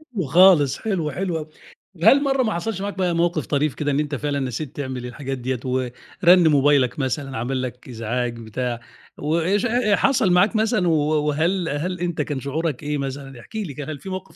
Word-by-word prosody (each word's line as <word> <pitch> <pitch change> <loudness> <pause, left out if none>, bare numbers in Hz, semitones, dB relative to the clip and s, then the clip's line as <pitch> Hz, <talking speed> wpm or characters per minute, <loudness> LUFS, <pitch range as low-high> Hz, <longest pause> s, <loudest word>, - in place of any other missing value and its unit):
حلو 185 -6 -1
خالص 150 -3 +5
حلو 180 -9 -2
حلو 175 +2 -2
أوي. 155 0 -6 0.6
هل 280 +8 +6
مرّة 270 -1 +2
ما 220 -3 0
حصلش 190 +3 -3
معاك 200 0 -4
بقى 180 -2 +1
موقف 170 -3 0
طريف 145 -1 0
كده 145 -1 -1
إن 140 - +1
أنت 150 -1 -2
فعلًا 145 +1 -2
نسيت 130 +2 -4
تعمل 130 -3 -4
الحاجات 135 +2 -5
ديّة 125 0 -3
ورن 130 +8 +2
موبايلك 140 -3 +3
مثلًا، 135 0 -2
عمل 130 +3 -2
لك 125 0 -7
إزعاج 120 +1 -3
بتاع، 120 +2 -4 0.4
و 155 +3 0
اشح 195 +7 +1 0.3
حصل 210 -2 +2
معاك 185 +5 +4
مثلًا 215 -5 +2
و - - +3 0.4
وهل 165 +4 0
هل 170 +5 -3
أنت 175 -3 -2
كان 145 -2 -3
شعورك 145 +1 -3
إيه 150 0 -1
مثلًا؟ 135 -1 -6
احكِ 220 - -17
لي 200 -10 -3
كده، 145 +2 -6
هل 145 - -7
في 190 - -9
موقف 185 0 -7
150 Hz, 195 wpm, -22 LUFS, 130-180 Hz, 0.6 s, هل